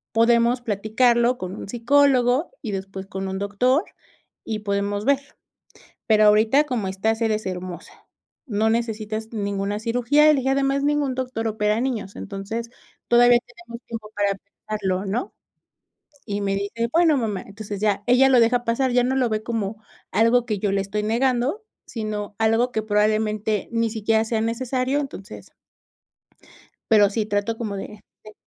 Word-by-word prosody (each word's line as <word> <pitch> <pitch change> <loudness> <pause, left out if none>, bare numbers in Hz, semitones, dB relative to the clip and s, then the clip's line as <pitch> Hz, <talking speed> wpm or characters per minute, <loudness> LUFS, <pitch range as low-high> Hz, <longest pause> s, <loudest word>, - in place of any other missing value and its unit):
podemos 235 +2 +3
platicarlo 235 +3 +2
con 185 +1 -5
un - - -8
psicólogo 255 - +2
y 220 -6 -4
después 195 0 -6
con 195 0 -5
un 190 0 -4
doctor, 250 - +1 0.6
y 215 -1 -3
podemos 205 0 -2
ver, 280 -1 +4 0.9
pero 215 -1 +5
ahorita, 220 +8 +4
como 235 -8 -2
estás, 220 +4 -1
eres 215 -1 0
hermosa, 180 -1 -7 0.4
no 220 -2 0
necesitas 220 -1 -2
ninguna 200 -1 -2
cirugía", 245 +6 +2
y 305 - +7
le 280 - +1
dije: 265 - -1
"Además, 275 +1 +1
ningún 290 -3 +1
doctor 250 -3 -3
opera 210 0 0
niños, 225 -6 -3
entonces, 215 +4 -5 0.4
todavía 240 0 +6
tenemos 240 -2 -12
tiempo 220 -2 -7
para 205 -1 +1
pensarlo", 200 -1 -4
¿no?, 215 +6 -3 0.9
y 205 -2 -3
me 195 -1 -1
dice: 200 +4 -2
"Bueno, 325 -4 +4
mamá", 210 -5 -2
entonces 205 0 -7
ya, 205 -2 +1
ella 260 +2 +5
lo 250 - +6
deja 240 +1 +2
pasar, 250 +3 +1
ya 245 0 +3
no 260 +1 0
lo 255 -2 +2
ve 215 -1 -2
como 220 -2 -4 0.3
algo 230 +2 +3
que 210 -4 -2
yo 200 0 -1
le 195 - +1
estoy 205 +2 -3
negando, 250 - 0 0.2
sino 215 -2 -5
algo 225 +3 +2
que 220 - -1
probablemente 215 0 0
ni 230 -1 0
siquiera 220 0 +1
sea 225 -1 -1
necesario, 255 +4 -1
entonces 265 -9 -7 1.4
Pero 210 -3 +6
sí, 215 +1 -1
trato 205 +2 -1
como 215 -4 -4
de 205 +1 -8 0.2
Sí. 215 0 -13
220 Hz, 160 wpm, -23 LUFS, 205-245 Hz, 1.4 s, y